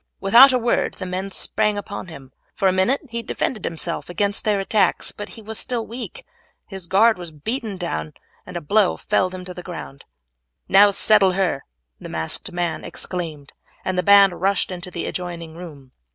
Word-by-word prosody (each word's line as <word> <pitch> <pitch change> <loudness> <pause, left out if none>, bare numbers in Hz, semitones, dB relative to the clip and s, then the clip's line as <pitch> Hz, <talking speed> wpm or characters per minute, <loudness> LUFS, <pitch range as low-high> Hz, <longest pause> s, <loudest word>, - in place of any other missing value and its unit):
Without 235 +8 +8
a 255 - +3
word 240 -1 0
the 185 - -5
men 185 +2 -3
sprang 210 +2 0
upon 205 -2 -6
him. 140 -6 -11 0.2
For 195 - +2
a - - +5
minute 190 +9 +2
he 235 0 -3
defended 225 -1 -3
himself 165 +1 -4
against 200 +3 -1
their 210 -2 +2
attacks, 200 +2 +1
but 205 0 -8
he 225 - -11
was 220 +1 -4
still 240 -3 -2
weak, 255 - -8 0.4
his 190 -3 -8
guard 215 +3 +4
was 175 -1 -7
beaten 215 - -4
down, 80 - -4 0.3
and 180 -1 -7
a - - -5
blow 200 +5 +2
felled 185 0 0
him 180 0 -8
to 180 - -7
the 180 - -8
ground. 165 -6 -9 0.6
"Now 200 +2 +7
settle 200 -1 +4
her," 180 -7 0 0.3
the - - -9
masked 80 0 -3
man 175 -1 -2
exclaimed, 160 -6 -6 0.3
and 185 - -1
the 180 - +2
band 195 -1 +6
rushed 195 0 +1
into 180 0 -6
the 170 -1 -4
adjoining 170 -3 -5
room. 150 -7 -11
185 Hz, 185 wpm, -22 LUFS, 175-210 Hz, 0.6 s, Without